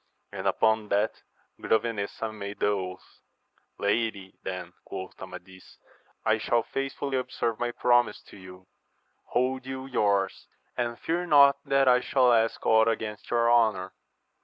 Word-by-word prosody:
and - - -4
upon 110 -1 +2
that 105 +2 0 0.4
Grove 110 - +2
nesa 110 -1 -4
made 100 -1 -7
the - - +1
oatL 95 -3 -1 0.8
Lady, 100 -2 -1
then, 90 -2 -6
quoth 95 -1 -8
Amadis, 95 0 -11 0.5
I 110 0 +3
shall 115 +1 +1
faithfully 135 +2 -3
observe 115 -3 -3
my 120 - 0
promise 120 -2 +2
to - - -13
you: 95 -1 -13 0.6
hold 130 +1 -1
you 130 0 -5
yours, 100 -7 0 0.3
and 120 -1 -2
fear 175 +2 -2
not 140 -3 +7
that 135 -1 +3
I 125 0 +6
shall 125 -1 +3
ask 115 -1 +1
ought 110 0 +5
against 110 -2 -3
your 120 0 +3
honour. 105 -6 +2
110 Hz, 140 wpm, -27 LUFS, 100-125 Hz, 0.8 s, not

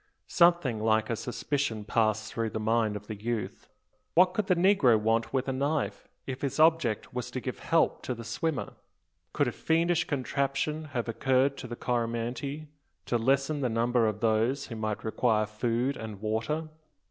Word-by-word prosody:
Something 170 -10 +3
like 110 +1 +2
a - - +1
suspicion 120 -1 -2
passed 110 0 0
through 115 -1 -1
the 110 - -4
mind 110 -1 +1
of 105 0 -7
the 110 - -5
youth. 110 +1 -4 0.5
What 180 +1 +5
could 205 0 -1
the 180 - +4
negro 170 - +4
want 115 +2 +1
with 130 0 -1
a 135 - 0
knife, 140 +3 -1 0.2
if 130 -1 -5
his 140 +1 -2
object 155 -9 +3
was 125 0 -4
to 130 - -4
give 130 0 -5
help 165 -1 +1
to 125 - -2
the 115 - -8
swimmer? 125 +7 -2 0.6
Could 145 -3 +1
a - - 0
fiendish 170 +5 +1
conception 140 +2 -1
have 120 -1 -1
occurred 130 +4 +2
to 125 - -7
the 120 - -6
Coromantee, 120 +5 -3 0.4
to 120 - 0
lessen 135 +4 +1
the 125 - +1
number 115 0 +2
of 105 -1 -3
those 115 +5 +1
who 115 - -5
might 110 -1 -3
require 110 -1 +1
food 120 +5 -1
and 110 -3 -7
water? 115 +9 -2
125 Hz, 175 wpm, -29 LUFS, 110-140 Hz, 0.6 s, What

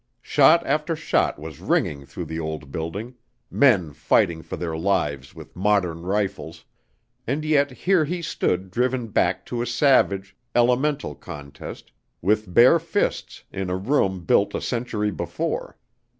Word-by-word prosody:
Shot 155 +4 +5
after 150 +3 0
shot 155 - 0
was 75 -1 -9
ringing 70 -1 -1
through 90 - -6
the 80 +1 -5
old 80 -3 -5
building, 95 - -5 0.4
men 100 - +3
fighting 80 +3 +2
for - - -7
their 85 -2 -3
lives 75 -7 -1
with - - -12
modern 90 -4 +1
rifles, 90 -4 -3 0.6
and 150 +4 -1
yet 145 -2 +3
here 175 +6 +2
he 170 +3 -3
stood 95 - -1
driven 125 +1 0
back - - +1
to 120 -1 -3
a 120 - -2
savage, 115 -7 +2 0.2
elemental 125 - +2
contest 70 0 -10 0.3
with 105 +1 0
bare 125 - +6
fists 170 +5 -2
in 95 -1 -4
a 90 - -1
room 95 - 0
built - - +2
a - - -2
century 115 -3 -2
before. - - -4
100 Hz, 145 wpm, -23 LUFS, 85-130 Hz, 0.6 s, bare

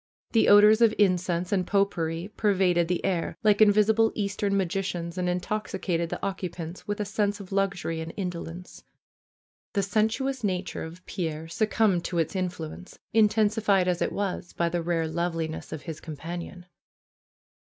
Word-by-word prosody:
The 225 - +4
odors 210 +2 +7
of 225 -2 +5
incense 180 -3 +1
and 185 -3 +1
pot 200 0 +2
pourri 165 +3 -3
pervaded 185 -5 +2
the 180 0 -1
air, 175 -3 -1
like 210 -1 +4
invisible 215 +1 +5
Eastern 200 -1 -1
magicians, 180 -2 -2
and 180 -1 -1
intoxicated 180 -2 -2
the - - -4
occupants 180 -3 -5
with 205 0 -2
a 210 - -1
sense 205 0 -1
of 200 -1 -10
luxury 195 -4 -1
and 160 0 -5
indolence. 180 -2 -6 0.9
The 200 - +1
sensuous 225 +6 0
nature 185 -2 -2
of 170 +3 -10
Pierre 160 -4 -4
succumbed 210 0 +1
to 175 - -2
its 165 +3 0
influence, 180 -1 -5 0.2
intensified 210 -3 +3
as 180 -1 0
it - - +1
was 195 -3 -3
by 170 0 0
the 175 0 -1
rare 165 -1 0
loveliness 165 -1 -3
of 155 - -6
his 160 -2 -6
companion. 170 +3 -7
185 Hz, 155 wpm, -27 LUFS, 170-205 Hz, 0.9 s, odors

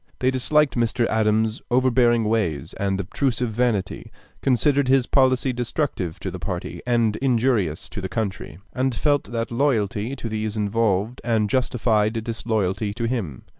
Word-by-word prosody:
They 130 +1 +1
disliked 150 +3 +2
Mr. 120 0 +1
Adams's 110 0 +1
overbearing 120 -2 +3
ways 105 -9 -1
and 100 -1 -1
obtrusive 120 +4 -1
vanity, 110 -4 -1 0.3
considered 140 +1 +2
his 130 -1 +4
policy 130 -1 +2
destructive 120 - -2
to - - -4
the - - -7
party - - -5
and 115 -3 +2
injurious 115 - +1
to 100 - -6
the 95 - -4
country, 95 -6 -4 0.2
and 130 -1 0
felt 145 +3 +1
that 115 +2 -4
loyalty 115 -2 0
to 125 - -6
these 110 -1 -3
involved 105 +1 0
and 110 -3 +1
justified 115 -3 +1
disloyalty 110 -3 -2
to 115 - -4
him. 110 - -3
115 Hz, 145 wpm, -23 LUFS, 105-125 Hz, 0.3 s, his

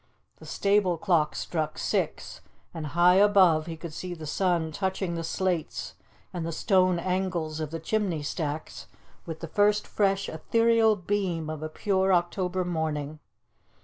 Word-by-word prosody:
The - - -13
stable 200 -3 +2
clock 165 -4 +1
struck 160 -3 -3
six, - - -2 0.3
and 160 -2 -5
high 180 +1 +6
above 185 -6 +5
he 165 -1 -5
could 160 -1 -8
see 180 +2 -5
the 160 -2 -8
sun 170 0 0
touching 190 +1 -2
the 165 -1 -3
slates 175 -1 -2 0.4
and 175 -2 -3
the 165 - -3
stone 185 +1 +2
angles 175 -3 -2
of 155 -2 -3
the 165 +1 -5
chimney 180 -3 -1
stacks 150 0 -4 0.4
with 160 -1 -6
the 165 - -5
first 205 +4 +2
fresh 195 -1 0
ethereal 230 +6 +3
beam 180 -5 -2
of 155 -1 -6
a 155 - -4
pure 190 +2 +1
October 180 +1 0
morning. 155 -3 -3
175 Hz, 150 wpm, -27 LUFS, 160-190 Hz, 0.4 s, high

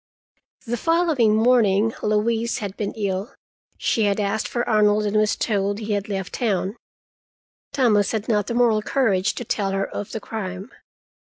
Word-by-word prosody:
The 240 +1 -2
following 320 -9 +2
morning 225 -2 +3
Louise 225 +2 0
had 200 -2 -5
been 205 - -3
ill. 200 +2 -3 0.4
She 220 - +1
had 200 0 +1
asked 205 +1 -1
for 240 0 -2
Arnold, 210 -1 +3
and 205 0 -1
was 215 0 +3
told 205 -2 -1
he 215 -1 -3
had 205 +1 -2
left 190 -2 -4
town. 200 -3 -1 1.0
Thomas 215 -7 +2
had 220 -1 -3
not 210 -3 +1
the 235 - -2
moral 235 -3 +3
courage 215 -5 +1
to 245 - -5
tell 200 -2 -1
her 195 0 0
of 205 - -6
the 220 - -4
crime. 195 0 -6
215 Hz, 165 wpm, -22 LUFS, 200-230 Hz, 1.0 s, morning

